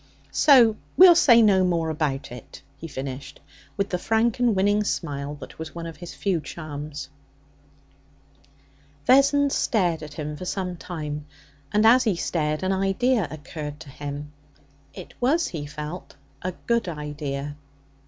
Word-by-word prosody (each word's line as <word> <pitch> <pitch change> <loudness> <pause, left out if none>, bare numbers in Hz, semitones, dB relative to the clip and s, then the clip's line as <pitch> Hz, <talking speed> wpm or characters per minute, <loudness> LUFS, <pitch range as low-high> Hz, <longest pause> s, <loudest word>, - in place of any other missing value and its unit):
'So 245 -7 +6 0.2
we'll 365 0 +10
say 245 -9 +6
no 195 -3 +5
more 170 -3 0
about 145 -5 -2
it,' 125 -2 -11 0.2
he 165 - -7
finished, 135 -2 -7 0.4
with 200 0 0
the 180 - -2
frank 225 +4 +1
and 240 -4 +3
winning 205 +2 +2
smile 145 -7 -3
that 145 - -12
was 160 0 -7
one 170 -1 -5
of 165 -1 -8
his 175 -1 -9
few 185 -5 0
charms. 150 -1 -7 2.0
Vessons 280 +2 +4
stared 175 -8 +1
at 150 -1 -9
him 150 -1 -4
for 180 - -7
some 180 -1 -3
time, 150 -4 -6 0.4
and, 210 +1 +3
as 250 +3 +7
he 210 -5 +2
stared, 155 -1 -1
an 185 - +1
idea 195 +3 +1
occurred 150 0 -7
to 160 -3 -11
him. 145 +1 -6 0.6
It - - -11
was, 310 +7 +2
he 150 -4 -5
felt, 150 +4 -7 0.3
a 185 0 -3
good 235 -3 +1
idea. 145 -2 -5
170 Hz, 150 wpm, -24 LUFS, 150-210 Hz, 2.0 s, we'll